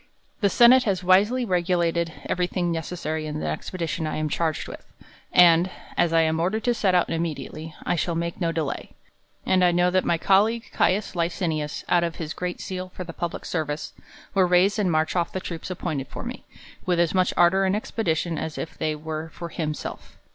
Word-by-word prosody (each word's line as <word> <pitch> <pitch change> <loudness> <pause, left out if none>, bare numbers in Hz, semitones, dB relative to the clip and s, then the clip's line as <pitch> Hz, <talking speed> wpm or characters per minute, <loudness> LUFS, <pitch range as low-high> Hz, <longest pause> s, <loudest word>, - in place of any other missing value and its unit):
The 200 - +3
senate 245 +4 +6
has 190 -4 0
wisely 205 +8 +4
regulated 175 -3 +1
every 180 0 0
thing 175 -2 -1
neces 165 +2 -4
sary 155 -1 -3
in 150 0 -4
the - - -4
expedition 165 -2 -3
1 155 - -2
am 155 0 -1
charged 160 0 -1
with; - - -9 0.5
and, 175 0 +6 0.3
as 170 - +2
I 165 0 +4
am'^ordered 165 +7 0
to 245 - +2
set 195 -5 +1
out 175 - +2
immediately, 160 -1 -4
I 175 - +1
shall 170 0 -1
make 170 +2 -3
no 165 -1 +1
delay; 160 -4 -3 0.5
and 185 -1 +3
I 180 - +6
know 175 +1 +3
that 185 0 +2
my 170 - +1
colleague 210 +6 +2
Caius 200 0 +1
Licinius, 165 -3 -2
out 175 -1 +3
of 170 -1 -2
his 160 -2 -5
great 180 0 -4
zeal 185 -1 -5
for 185 - -5
the 170 -1 -8
public 170 0 -4
service, 155 -3 -3 0.4
will 195 -2 +4
raise 180 +3 +3
and 190 -4 +2
march 155 0 +1
otf 175 -2 -1
the 185 - -2
troops 170 -2 -6
appointed 160 -7 -3
for - - -8
me, - - -7 0.4
with 180 -2 +1
as 170 -2 +2
much 185 -1 +2
ardor 175 +3 +5
and 190 +1 +2
expedition, 170 -6 -1
as 160 -1 -5
if - - -5
they 155 -1 -1
were 155 +1 -5
for 170 +1 -8
him 155 -2 -3
self. - - -8
175 Hz, 205 wpm, -25 LUFS, 160-185 Hz, 0.5 s, senate